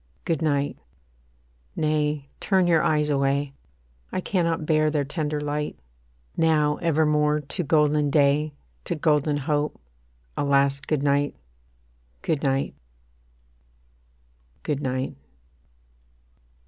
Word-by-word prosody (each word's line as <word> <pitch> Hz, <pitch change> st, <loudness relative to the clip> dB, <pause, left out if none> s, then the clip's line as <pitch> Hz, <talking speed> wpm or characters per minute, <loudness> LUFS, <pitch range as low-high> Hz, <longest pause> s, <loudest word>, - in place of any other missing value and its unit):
Good 165 Hz, -4 st, 0 dB
night 145 Hz, -2 st, 0 dB, 1.0 s
nay, 150 Hz, -2 st, 0 dB
turn 190 Hz, -2 st, +2 dB
your 165 Hz, -2 st, +4 dB
eyes 150 Hz, -1 st, +1 dB
away; 140 Hz, 0 st, +1 dB, 0.6 s
I -, -, -1 dB
cannot 170 Hz, -4 st, 0 dB
bear 155 Hz, -1 st, +3 dB
their 150 Hz, -1 st, 0 dB
tender 150 Hz, 0 st, -2 dB
light. 150 Hz, 0 st, -3 dB, 0.6 s
Now 150 Hz, -2 st, +2 dB
evermore 150 Hz, -2 st, +2 dB
to 150 Hz, +6 st, -3 dB
golden 150 Hz, -1 st, +3 dB
day, 145 Hz, +1 st, +2 dB, 0.3 s
To -, -, -2 dB
golden 150 Hz, -1 st, +2 dB
hope, 145 Hz, +1 st, -1 dB, 0.6 s
a -, -, -1 dB
last 140 Hz, 0 st, +2 dB
Good 150 Hz, -3 st, 0 dB
night, 145 Hz, 0 st, +1 dB, 0.9 s
Good 155 Hz, -3 st, 0 dB
night 135 Hz, -1 st, 0 dB, 1.9 s
Good 145 Hz, -2 st, -2 dB
night. 130 Hz, -1 st, -2 dB
150 Hz, 105 wpm, -25 LUFS, 145-155 Hz, 1.9 s, your